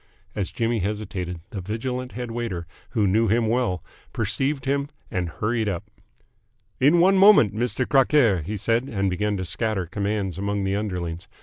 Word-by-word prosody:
As 100 -3 -1
Jimmy 115 -1 -1
hesitated, 95 -4 -3
the 100 - -4
vigilant 125 +6 -4
head 120 -1 -5
waiter, 115 -8 -3 0.2
who 110 -3 +1
knew 110 +4 +3
him 115 +2 +2
well, 115 -7 0 0.3
perceived 130 +6 -1
him, 140 +1 0 0.2
and 90 -2 -1
hurried 110 +5 -1
up. 90 -4 -5 0.9
"In 150 +6 +5
one 190 +2 +5
moment, 195 - +7
Mister 120 +2 -1
Crockaire!" 130 - +4
he 105 +8 -4
said, 115 +4 +1
and 100 -3 0
began 105 +2 -1
to 95 - -3
scatter 105 0 -1
commands 100 +1 -2
among 100 0 -1
the 95 0 0
underlings. 90 -4 -3
105 Hz, 165 wpm, -24 LUFS, 95-120 Hz, 0.9 s, moment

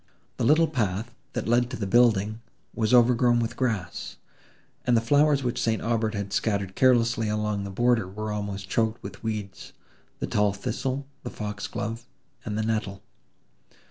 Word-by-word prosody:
The - - -1
little 155 +7 +5
path, 115 - -2 0.2
that - - -3
led 120 +1 +3
to 130 - -5
the 100 - -3
building, 110 0 +3 0.3
was 110 -2 0
overgrown 120 0 +5
with 120 0 -2
grass 105 -9 -3 0.7
and 120 -1 +3
the - - +5
flowers 145 +4 +3
which 120 -1 -1
St. 110 -1 +1
Aubert 115 -2 0
had 100 -1 -4
scattered 100 -4 0
carelessly 120 -3 +3
along 105 -1 -1
the - - -5
border 120 0 +2
were 105 +3 -5
almost 100 -2 -4
choked 110 +3 0
with 100 0 -8
weeds—the 105 -3 -7
tall 105 -1 +1
thistle—the 135 +7 -4
fox 105 -1 -5
glove, 115 +3 -5 0.4
and 105 -1 -3
the 110 - 0
nettle. 110 -3 -2
110 Hz, 155 wpm, -26 LUFS, 105-120 Hz, 0.7 s, little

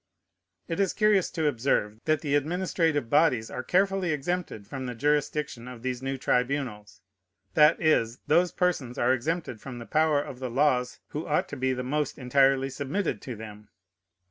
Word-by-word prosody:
It 165 - -3
is 195 -2 +2
curious 210 -3 +3
to 160 -2 -2
observe, 115 -6 0
that 155 -2 +2
the 145 -3 -2
administrative 160 -2 +1
bodies 130 -5 +2
are 125 - -4
carefully 190 +4 +1
exempted 150 - -3
from 130 +3 -6
the 125 - -5
jurisdiction 145 -2 -1
of 125 -2 -10
these 130 -1 -3
new 135 0 -3
tribunals. 125 -5 -1 0.5
That 155 +1 +5
is, 125 -8 +2
those 170 +4 +3
persons 155 -9 -1
are 125 +2 +3
exempted 140 -2 -3
from 130 -3 -8
the 120 - -8
power 155 0 +2
of 135 -3 -6
the 130 -1 -4
laws 125 -1 +1
who 150 +2 -5
ought 150 - +1
to - - -5
be 130 -1 0
the 125 0 -3
most 145 +2 -2
entirely 135 +1 +3
submitted 150 +8 -2
to 125 - -6
them. 105 -1 -10
140 Hz, 170 wpm, -27 LUFS, 125-160 Hz, 0.5 s, That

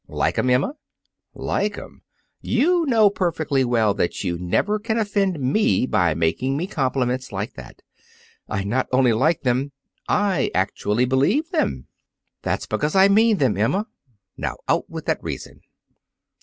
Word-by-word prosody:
"Like - - -1
'em, 130 - +1
Emma?" 125 - +2 0.6
"Like 205 0 -2
'em? - - -11 0.4
You 330 +7 +2
know 220 -5 +4
perfectly 155 -8 0
well 115 -4 +2
that 90 - -2
you 90 -3 -1
never 200 - 0
can 220 +1 -2
offend 200 -5 0
me 135 +5 +2
by 90 -10 +1
making 85 - 0
me 170 - -1
compliments 130 - -1
like 100 +2 -4
that. 60 -2 -12 0.7
I 95 - -2
not 120 +7 -1
only 130 -2 +4
like 150 +9 +1
them; 130 +2 0 0.4
I 205 -3 +1
actually 105 +5 0
believe 185 - +1
them!" 320 -4 -1 0.6
"That's - - -2
because 150 +3 -2
I 190 +1 +6
mean 220 +1 +4
them, 130 - +2
Emma. 115 - 0 0.5
Now, - - -3
out - - 0
with - - -7
that - - -1
reason!" - - -7
135 Hz, 150 wpm, -22 LUFS, -, 0.7 s, I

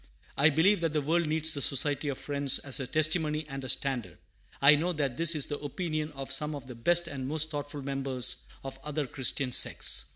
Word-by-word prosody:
I 150 +3 +5
believe 170 +6 +3
that 165 -2 -1
the 150 - +1
world 165 +3 +1
needs 160 +1 +2
the 140 - -2
Society 145 +2 0
of 140 -2 -2
Friends 140 -2 0
as 140 -1 -1
a 135 - -4
testimony 155 0 +1
and 135 -1 -7
a 130 - -6
standard. 125 -11 -1 0.4
I 140 +2 +7
know 170 +5 0
that 140 -5 -2
this 165 +3 +4
is 150 - +2
the 145 - -5
opinion 155 +1 -4
of 135 -1 -7
some 150 +3 +2
of 140 -3 -8
the 130 - -9
best 170 +9 +3
and 135 -4 -5
most 155 +2 -1
thoughtful 145 -1 -5
members 135 -2 -1 0.3
of 135 0 -8
other 150 0 -3
Christian 130 0 -2
sects. 60 - +1
145 Hz, 215 wpm, -29 LUFS, 135-155 Hz, 0.4 s, I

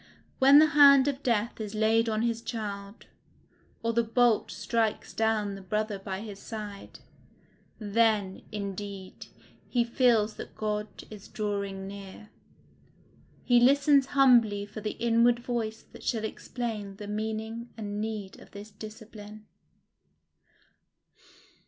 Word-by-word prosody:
When 275 +2 +8
the 310 - +8
hand 280 -2 +7
of 280 -1 -2
death 230 -2 -1
is 210 0 -5
laid 225 +1 +2
on 215 0 0
his 230 -1 -1
child, 205 -2 -6 0.8
or 230 0 0
the 235 - +3
bolt 230 0 +2
strikes 225 -2 -2
down 220 -2 0
the 195 - -8
brother 210 +2 -2
by 195 0 -5
his 205 -3 -8
side, 210 -3 -8 0.8
then, 210 -2 +1
indeed, 200 -1 -6 0.4
he 240 -2 +2
feels 235 -3 +2
that - - -9
God 210 0 -2 0.2
is 210 -2 -10
drawing 200 -2 -4
near; 200 +1 -10 1.1
he 245 -1 +4
listens 275 +2 +4
humbly 230 -7 +5
for 210 +1 -9
the 210 0 -4
inward 235 +1 +3
voice 235 -2 -4
that - - -13
shall 220 -3 -1
explain 220 -3 -5
the 205 - -8
meaning 220 +2 -4
and 205 -1 -4
need 215 -3 -5
of - - -15
this 205 +1 -11
discipline. 215 0 -11
215 Hz, 125 wpm, -28 LUFS, 205-235 Hz, 1.1 s, When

